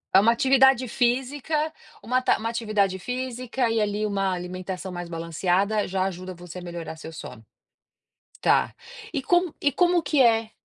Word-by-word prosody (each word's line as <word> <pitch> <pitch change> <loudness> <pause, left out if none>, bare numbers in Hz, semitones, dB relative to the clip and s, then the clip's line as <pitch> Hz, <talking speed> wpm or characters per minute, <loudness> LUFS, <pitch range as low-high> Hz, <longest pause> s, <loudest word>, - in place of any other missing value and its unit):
É - - +10
uma 220 +4 +5
atividade 265 +1 +4
física, 270 +6 0 0.3
uma 250 +3 +1
ta - - +3
uma 225 - -4
atividade 210 -5 0
física 250 +2 -2
e 225 - +1
ali 210 0 0
uma 195 -2 0
alimentação 185 +1 -5
mais 175 -1 -6
balanceada 180 +5 0
já 185 0 0
ajuda 185 -1 -4
você 175 +1 -9
a - - -9
melhorar 170 -2 -7
seu 160 0 -9
sono? 130 -8 -9 1.0
Tá, - - +2 0.4
e 285 - -2
como 350 +1 +2
e 285 - +2
como 350 +3 +3
que 290 -2 +2
é 225 -2 +3
215 Hz, 165 wpm, -25 LUFS, 185-255 Hz, 1.0 s, É